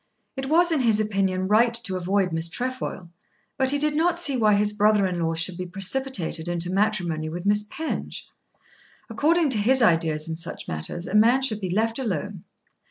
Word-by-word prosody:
It 265 Hz, 0 st, -4 dB
was 345 Hz, +2 st, +4 dB
in 315 Hz, -, +2 dB
his 225 Hz, -4 st, +3 dB
opinion 195 Hz, -3 st, 0 dB
right 230 Hz, +3 st, +3 dB
to 225 Hz, -5 st, -2 dB
avoid 185 Hz, +1 st, 0 dB
Miss 165 Hz, +1 st, -1 dB
Trefoil, 245 Hz, -5 st, -4 dB, 0.5 s
but 265 Hz, 0 st, +1 dB
he 285 Hz, -, +2 dB
did 300 Hz, +1 st, 0 dB
not 335 Hz, +2 st, +1 dB
see 290 Hz, -6 st, +1 dB
why 215 Hz, -4 st, +3 dB
his 205 Hz, +1 st, +1 dB
brother 210 Hz, -1 st, +3 dB
in 180 Hz, -2 st, -2 dB
law 165 Hz, -1 st, -1 dB
should 170 Hz, +2 st, +1 dB
be 185 Hz, -, -3 dB
precipitated 195 Hz, -3 st, -2 dB
into 175 Hz, 0 st, -2 dB
matrimony 185 Hz, -6 st, 0 dB
with 175 Hz, +3 st, -6 dB
Miss 210 Hz, +1 st, +2 dB
Penge. 320 Hz, 0 st, -5 dB, 0.8 s
According 320 Hz, -1 st, +2 dB
to 220 Hz, -, +3 dB
his 260 Hz, +6 st, +3 dB
ideas 165 Hz, -5 st, +1 dB
in 160 Hz, -, -4 dB
such 165 Hz, +1 st, -7 dB
matters 80 Hz, -, -5 dB
a -, -, -6 dB
man 235 Hz, +5 st, +4 dB
should 215 Hz, -5 st, 0 dB
be 185 Hz, -, -3 dB
left 225 Hz, +6 st, 0 dB
alone. 195 Hz, -, -4 dB
210 Hz, 190 wpm, -24 LUFS, 175-255 Hz, 0.8 s, was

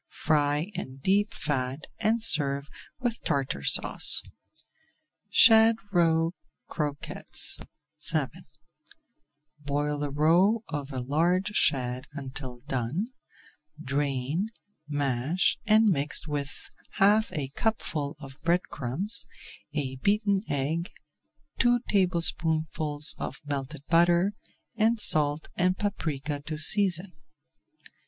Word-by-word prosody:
Fry 150 Hz, +3 st, 0 dB
in 135 Hz, -8 st, -6 dB
deep 200 Hz, +9 st, +1 dB
fat 135 Hz, -, -3 dB
and 220 Hz, +2 st, +1 dB
serve 140 Hz, -6 st, +3 dB, 0.3 s
with 240 Hz, -3 st, -3 dB
Tartar 140 Hz, -2 st, -2 dB
Sauce. -, -, +1 dB, 1.1 s
SHAD 225 Hz, +1 st, +6 dB, 0.2 s
ROE 165 Hz, -2 st, +2 dB, 0.4 s
CROQUETTES 145 Hz, -3 st, +1 dB, 0.5 s
VII 155 Hz, -4 st, +1 dB, 1.3 s
Boil 145 Hz, 0 st, -2 dB
the 145 Hz, 0 st, -2 dB
roe 175 Hz, +10 st, +2 dB
of 145 Hz, -3 st, -5 dB
a 130 Hz, -2 st, -4 dB
large 170 Hz, +9 st, 0 dB
shad 130 Hz, -10 st, +1 dB
until 130 Hz, -3 st, -7 dB
done, 135 Hz, -, -3 dB, 0.7 s
drain, 145 Hz, +5 st, -2 dB, 0.4 s
mash, 145 Hz, +3 st, 0 dB
and 220 Hz, +1 st, +5 dB
mix 150 Hz, -3 st, 0 dB
with 145 Hz, -1 st, -3 dB, 0.4 s
half 210 Hz, +3 st, +3 dB
a 140 Hz, -3 st, -3 dB
cupful 150 Hz, -5 st, -2 dB
of 135 Hz, -1 st, -12 dB
bread 175 Hz, +2 st, +1 dB
crumbs, 150 Hz, -, -1 dB, 0.5 s
a 130 Hz, -3 st, -3 dB
beaten 200 Hz, -, +1 dB
egg, 155 Hz, +5 st, -2 dB, 0.7 s
two 245 Hz, -1 st, +3 dB
tablespoonfuls 160 Hz, -5 st, 0 dB
of 135 Hz, -, -5 dB
melted 140 Hz, 0 st, -5 dB
butter, 175 Hz, +3 st, +3 dB, 0.4 s
and 225 Hz, +1 st, +1 dB
salt 150 Hz, -4 st, +3 dB
and 185 Hz, +1 st, +1 dB
paprika 150 Hz, -8 st, -3 dB
to 155 Hz, +1 st, -5 dB
season. 180 Hz, +2 st, +6 dB
155 Hz, 100 wpm, -27 LUFS, 140-190 Hz, 1.3 s, SHAD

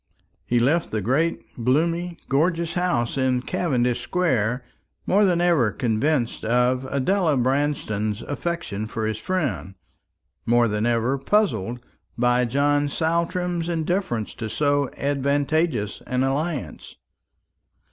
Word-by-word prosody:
He 120 Hz, -, +2 dB
left 150 Hz, +8 st, +2 dB
the 110 Hz, -, -1 dB
great 135 Hz, -, -1 dB
gloomy 170 Hz, +7 st, +1 dB
gorgeous 165 Hz, +4 st, +1 dB
house 170 Hz, -9 st, 0 dB
in 130 Hz, -1 st, +1 dB
Cavendish 125 Hz, -10 st, 0 dB
square 125 Hz, -, 0 dB, 0.4 s
more 205 Hz, +2 st, +4 dB
than 180 Hz, -3 st, +2 dB
ever 165 Hz, -11 st, +3 dB
convinced 120 Hz, +2 st, 0 dB
of 125 Hz, +3 st, +2 dB
Adela 150 Hz, +4 st, +1 dB
Branston's 125 Hz, -5 st, 0 dB
affection 145 Hz, -10 st, -3 dB
for 110 Hz, 0 st, -3 dB
his 110 Hz, 0 st, -2 dB
friend, 110 Hz, -, -2 dB, 0.7 s
more 120 Hz, 0 st, +3 dB
than 105 Hz, +1 st, 0 dB
ever 120 Hz, +3 st, +1 dB
puzzled 125 Hz, -, 0 dB, 0.3 s
by 125 Hz, +1 st, +3 dB
John 145 Hz, +3 st, +1 dB
Saltram's 170 Hz, +2 st, -1 dB
indifference 165 Hz, -, -1 dB
to 110 Hz, -2 st, -5 dB
so 145 Hz, +2 st, +1 dB
advantageous 140 Hz, -4 st, 0 dB
an 125 Hz, +1 st, 0 dB
alliance. 145 Hz, +2 st, -3 dB
135 Hz, 115 wpm, -23 LUFS, 120-165 Hz, 0.7 s, more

